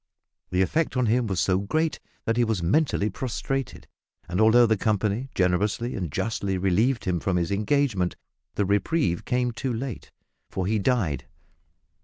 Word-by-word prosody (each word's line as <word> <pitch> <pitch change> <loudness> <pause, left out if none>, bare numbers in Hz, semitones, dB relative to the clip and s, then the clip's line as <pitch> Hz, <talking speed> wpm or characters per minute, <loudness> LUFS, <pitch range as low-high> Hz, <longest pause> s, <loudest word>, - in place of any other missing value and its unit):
The 90 +1 +2
effect 155 - 0
on 125 - +2
him 120 +1 +2
was 95 -3 -1
so 95 -1 +2
great 155 +11 -1 0.3
that 115 - +1
he 120 - +3
was 110 -6 -1
mentally 115 - +2
prostrated, 130 +4 -3 0.4
and 90 +4 0
although 115 +2 +6
the 110 -1 +3
company 110 +4 0
generously 100 +6 +1
and 90 -8 -3
justly 100 0 -1
relieved 105 +8 +1
him 90 -2 0
from 90 +2 0
his 85 0 -1
engagement, 105 -3 +1 0.4
the 100 - +1
reprieve 100 - +1
came 125 -1 0
too 125 +3 -3
late, 120 0 -5 0.4
for 95 - -3
he 110 +3 +1
died. 95 - 0
110 Hz, 160 wpm, -25 LUFS, 95-125 Hz, 0.4 s, although